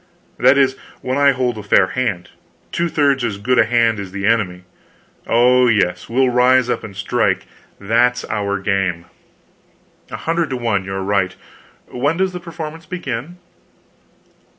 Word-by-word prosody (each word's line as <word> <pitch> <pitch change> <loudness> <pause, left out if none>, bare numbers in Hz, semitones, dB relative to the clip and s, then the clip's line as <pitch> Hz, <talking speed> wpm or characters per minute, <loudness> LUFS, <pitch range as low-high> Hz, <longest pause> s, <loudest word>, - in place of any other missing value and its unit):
That 140 - +5
is, 135 -1 +3 0.3
when 130 +2 -2
I 140 0 +5
hold 125 -4 -1
a - - -5
fair 100 -2 +3
hand 105 -9 -2 0.4
two 170 0 -1
thirds 140 -4 +1
as 110 -4 -2
good 125 +5 +1
a - - +5
hand 115 -1 +2
as 95 -2 -7
the 100 0 -4
enemy. 100 -5 0 0.6
Oh, 125 +2 +4
yes, 90 -6 0
we'll 130 +2 +2
rise 125 0 +3
up - - -2
and 100 -3 -9
strike; 100 - 0 0.3
that's 120 +4 +1
our 100 -2 -2
game." 95 -3 -1 1.0
"A - - -6
hundred 165 0 -1
to 130 - -3
one 110 -6 -1
you 95 - -5
are 95 - -3
right. 95 -2 0 0.5
When 145 +6 -1
does 190 0 0
the 180 - -5
performance 165 -2 -8
begin?" 150 -1 -5
120 Hz, 160 wpm, -18 LUFS, 100-135 Hz, 1.0 s, That